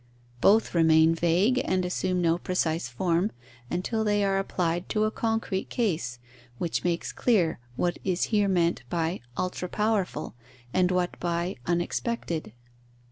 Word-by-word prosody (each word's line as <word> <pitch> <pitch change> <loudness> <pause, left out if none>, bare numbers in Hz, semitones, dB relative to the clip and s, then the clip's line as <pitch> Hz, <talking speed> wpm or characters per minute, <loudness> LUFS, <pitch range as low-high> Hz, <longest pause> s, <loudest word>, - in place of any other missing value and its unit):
Both 220 +3 +4
remain 160 -1 +5
vague 175 +10 +2
and 185 -1 0
assume 180 0 0
no 165 +1 +2
precise 165 -6 -1
form, 175 - 0 0.4
until 220 +5 -1
they 205 -1 +2
are 195 -1 +2
applied 175 -2 -1
to 215 - +1
a 215 - +1
concrete 225 -4 -1
case, 165 - -1 0.4
which 170 +3 -2
makes 175 -1 -1
clear 180 - +2 0.2
what 175 +6 -1
is 185 -2 0
here 205 -1 +4
meant 175 -4 +2
by 170 +1 -1 0.2
ultra 180 0 -2
powerful, 210 -2 -1 0.4
and 180 -1 +3
what 180 -1 -1
by 175 +1 -1
unexpected. 175 - -2
180 Hz, 135 wpm, -27 LUFS, 170-200 Hz, 0.4 s, remain